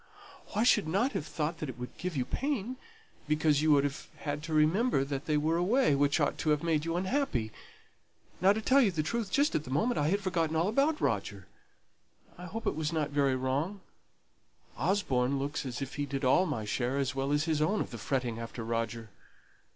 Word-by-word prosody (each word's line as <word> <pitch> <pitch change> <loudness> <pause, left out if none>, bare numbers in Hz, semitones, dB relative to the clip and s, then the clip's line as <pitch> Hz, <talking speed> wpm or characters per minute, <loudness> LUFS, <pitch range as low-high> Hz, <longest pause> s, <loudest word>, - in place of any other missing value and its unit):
"I 215 - +3
should 230 -7 +4
have 195 - 0
thought 160 +1 -3
that 130 -6 -5
would 125 0 -6
have - - -27
given 175 -2 -3
you 125 - 0
pain, 255 - -2 0.5
because 150 -1 +2
you 155 0 +3
would 140 -1 +4
have 145 0 -3
had 145 -1 -4
to 165 +1 -7
remember 155 - +3
that 140 0 -4
they 155 -1 +1
were 160 +3 +1
away, 215 - +3
which 140 +3 +2
ought 145 - 0
to 155 - 0
have 150 0 +2
made 160 -2 +1
you 165 0 -1
unhappy. 185 - -1 0.9
Now, 190 +2 +6
to 220 +2 -1
tell 275 +4 +5
you 230 - +4
the 160 -4 -1
truth, 230 +4 -2
just 285 +6 +2
at 150 - 0
the 130 - -10
moment 190 - +1
I 145 - +1
had 200 +5 +2
forgotten 165 -4 0
all 165 +3 +2
about 285 +7 +2
Roger. 100 -2 -2 0.9
I 180 - -9
hope 225 +5 -6
it - - +2
wasn't 155 -1 -1
very 140 -2 +2
wrong. 140 +10 -2 0.9
Osborne 140 - +1
looks 140 0 -3
as 125 +2 -4
if 135 - -7
he 145 0 -2
did 135 0 -3
all 180 +9 +4
my 120 -9 -3
share 125 +5 -1
as 140 0 0
well 135 +1 -1
as 145 +1 +2
his 155 -2 0
own 200 +8 +2
of - - -3
the 120 - -7
fretting 120 -1 -2
after 115 0 -6
Roger. 115 -1 -3
150 Hz, 210 wpm, -30 LUFS, 135-185 Hz, 0.9 s, Now